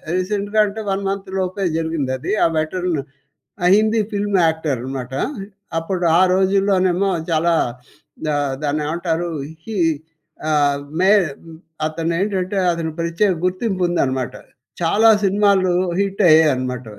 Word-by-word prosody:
రీసెంట్‌గా 205 +3 -1
అంటే 215 +2 -6
1 195 +1 -1
మంత్‌లోపే 190 0 -3
జరిగింది 160 -5 -2
అది. 130 - -4
ఆ - - +5
వెట్రన్ 165 0 -1 0.6
ఆ - - +3
హిందీ 220 +1 +2
ఫిల్మ్ 205 -1 0
యాక్టర్ 160 -4 -1
అనమాట. 130 0 -6 0.7
అప్పుడు 175 +2 -2
ఆ - - +5
రోజుల్లోనేమో 190 0 +2 0.2
చాలా 165 +1 +2 0.7
ద - - -1 0.3
దాన్నేమంటారు 160 +3 -1 0.3
హి 220 -1 -6 0.7
ఆహ్, 145 -2 +2 0.2
మే 190 +2 +4 0.8
అతను 165 +1 -2
ఏంటంటే 195 -1 -1
అతను 165 -1 -3
ప్రత్యేక 170 +4 +1
గుర్తింపు 185 +1 -1
ఉందనమాట. 130 -7 -1 0.5
చాలా 205 +7 +4 0.2
సినిమాలు 195 -1 +3 0.3
హిట్ 195 0 -1
అయ్యాయి 155 -1 +6
అనమాట. 125 -1 -4
180 Hz, 115 wpm, -20 LUFS, 160-195 Hz, 0.8 s, అయ్యాయి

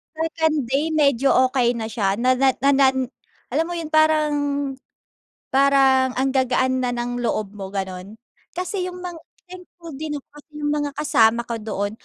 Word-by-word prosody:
Second 320 -1 0
day, 285 +4 +1
medyo 280 -4 +3 0.2
okey 245 -2 +1
na 225 -1 -4
siya 200 -3 0
na 250 +3 +2
na 265 0 +3 0.2
nan 265 -2 +2 0.4
alam 325 - +1
mo 350 - -5
'yon, 325 -2 -5
parang 310 -1 +3 1.2
parang 270 -1 +4
ang 265 +1 +1
gagaan 260 0 +1
na 250 -1 0
ng 245 0 -3
loob 215 -3 -2
mo, 195 -2 -7
ganon. 190 +1 -6 0.4
Kasi 365 +1 -3
yung 360 0 -9
mga 350 -2 -6 0.3
thankful 355 -2 -12
din 295 +1 -4
ako 275 - -13
kasi 295 - -21
'yung 295 0 -1
mga 290 -1 -1
kasama 235 -6 +3
ko 235 - -3
doon, 205 -2 -3
270 Hz, 165 wpm, -22 LUFS, 240-310 Hz, 1.2 s, parang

